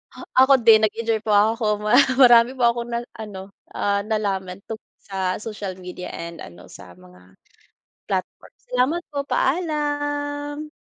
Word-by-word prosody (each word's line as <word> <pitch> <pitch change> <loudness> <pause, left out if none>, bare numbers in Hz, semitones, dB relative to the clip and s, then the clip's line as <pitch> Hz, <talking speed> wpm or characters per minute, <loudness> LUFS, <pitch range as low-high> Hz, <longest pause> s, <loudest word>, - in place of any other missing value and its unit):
Ah, - - -10 0.2
ako 270 +1 +6
din 220 -1 +7
nag-enjoy 220 0 0
po 220 - -7
ako 210 +1 +2
mara 245 +6 +6 0.2
marami 245 0 +6
po 245 - +2
akong 235 0 0
na 235 0 -2
ano, 200 -3 -9 0.2
ah, 200 0 0
nalaman 200 -4 -3
tungkol 225 -1 -10
sa 190 -2 -3
social 210 -4 -7
media 180 0 -8
and 170 0 -8
ano 85 0 -12
sa 90 -2 -14
mga, 90 0 -19 0.7
platform, 185 -2 -5 0.2
salamat 255 +8 0
po 285 -1 -4
paalam. 290 -1 -2
220 Hz, 145 wpm, -22 LUFS, 190-265 Hz, 0.7 s, din